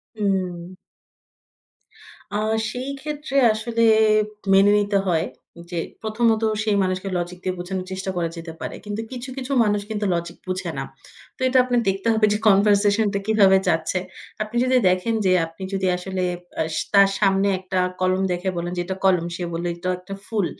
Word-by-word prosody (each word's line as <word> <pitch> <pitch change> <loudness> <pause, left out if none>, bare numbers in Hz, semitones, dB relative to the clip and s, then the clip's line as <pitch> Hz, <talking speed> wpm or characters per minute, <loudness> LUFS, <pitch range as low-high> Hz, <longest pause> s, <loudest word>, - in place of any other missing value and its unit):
উম। 185 -4 -2 1.6
আ 205 - 0 0.3
সেই 255 +2 -5
ক্ষেত্রে 295 -1 -5 0.2
আসলে 230 +1 -1 0.7
মেনে 195 +1 +6
নিতে 205 -1 +1
হয়। 165 -1 +1 0.5
যে 175 - -2 0.2
১ম 220 +2 -1 0.2
ত - - -3 0.2
সেই 215 -2 +1
মানুষকে 185 +1 -2
লজিক 175 +1 -4
দিয়ে 185 0 -1
বোঝানোর 185 +1 -4
চেষ্টা 190 0 -4
করা 170 -2 -1
যেতে 165 0 -7
পারে। - - -5
কিন্তু 205 +1 -4
কিছু, 255 +1 -6
কিছু 260 +1 -5
মানুষ 205 -1 +1
কিন্তু 210 -1 -2
লজিক 170 0 -4
বুঝে 185 0 -3
না। - - -2 0.5
তো - - -16
এটা 260 0 +2
আপনার 245 -1 +1
দেখতে 195 +3 -2
হবে 220 -1 +3
যে 210 - +1
কনভারসেশন 205 +1 +4
টা 200 - 0
কিভাবে 200 -3 +5
যাচ্ছে। 165 +2 +1 0.4
আপনি 215 +3 -10
যদি 255 0 +3
দেখেন 185 +5 0
যে, 185 - +4
আপনি 165 +3 -11
যদি 190 -1 0
আসলে 185 0 -3 0.4
আ - - +2 0.3
তার 200 0 +7
সামনে 195 -1 +3
একটা 185 0 -2 0.2
কলম 185 +1 +2
দেখে 180 +2 -1
বলেন 175 +1 -3
যে 175 - +1
"এটা 190 +1 -3
কলম। 180 -3 +3
সে 180 - -5
বলল 170 +1 -3
এটা 175 +1 -4
একটা 185 +2 -9
ফুল।" 215 -4 -1
195 Hz, 175 wpm, -22 LUFS, 180-215 Hz, 1.6 s, তার